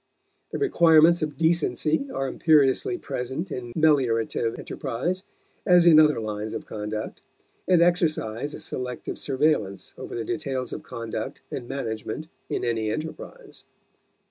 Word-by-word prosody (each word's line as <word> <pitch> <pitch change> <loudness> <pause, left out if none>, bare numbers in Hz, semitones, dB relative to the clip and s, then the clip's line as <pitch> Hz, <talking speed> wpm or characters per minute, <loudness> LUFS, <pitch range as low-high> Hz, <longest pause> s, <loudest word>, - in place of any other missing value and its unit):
The - - -4
requirements 170 - +5
of 150 -3 -3
decency 165 - +1
are 135 - -2
imperiously 150 - +3
present 130 - -4
in 120 -3 -5
meliorative 120 -7 +2
enterprise 150 +8 -3 0.4
as 180 -3 +5
in 160 -3 +8
other 150 -5 +5
lines 105 0 -4
of - - -5
conduct, 105 0 -5 0.5
and 180 -2 +5
exercise 155 -7 0
a - - -8
selective 125 -1 -5
surveillance 130 -8 0
over - - -7
the 115 - -3
details 135 -7 -3
of - - -5
conduct 115 +3 -6
and 120 - -5
management 135 +3 -4 0.2
in - - -2
any 115 -2 0
enterprise. 160 - -7
140 Hz, 130 wpm, -25 LUFS, 115-160 Hz, 0.5 s, in